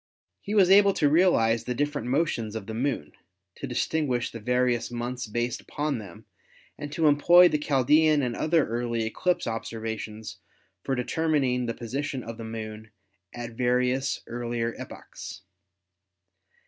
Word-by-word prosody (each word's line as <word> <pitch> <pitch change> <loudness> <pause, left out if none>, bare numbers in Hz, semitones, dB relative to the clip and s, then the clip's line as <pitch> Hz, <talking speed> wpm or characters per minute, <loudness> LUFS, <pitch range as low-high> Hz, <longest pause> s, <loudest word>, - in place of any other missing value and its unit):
He 205 - -4
was 190 -3 +5
able 200 0 +7
to 150 - +2
realize 140 -9 +3
the 125 - -2
different 145 -2 -2
motions 125 -6 0
of 110 - -5
the 110 - -6
Moon, 115 - -2 0.4
to - - -7
distinguish 135 -7 -1
the 115 - -7
various 125 +1 +1
months 120 0 -4
based 120 +2 -2
upon 145 -4 -3
them 100 -6 -11 0.5
and 145 0 -7
to 160 - 0
employ 170 +5 +7
the 150 - 0
Chaldean 150 +2 +3
and 120 -2 -2
other 160 0 +2
early 115 0 -2
eclipse 175 +10 0
ob 115 0 -3
servations 110 -2 -6 0.5
for 135 - -1
determining 130 -2 0
the 115 - -3
position 135 +2 -4
of 115 0 -8
the - - -5
Moon 110 -1 -7 0.4
at 120 -1 -7
various 125 +2 0
earlier 120 -1 -3
epochs. - - -9
125 Hz, 150 wpm, -26 LUFS, 115-145 Hz, 0.5 s, able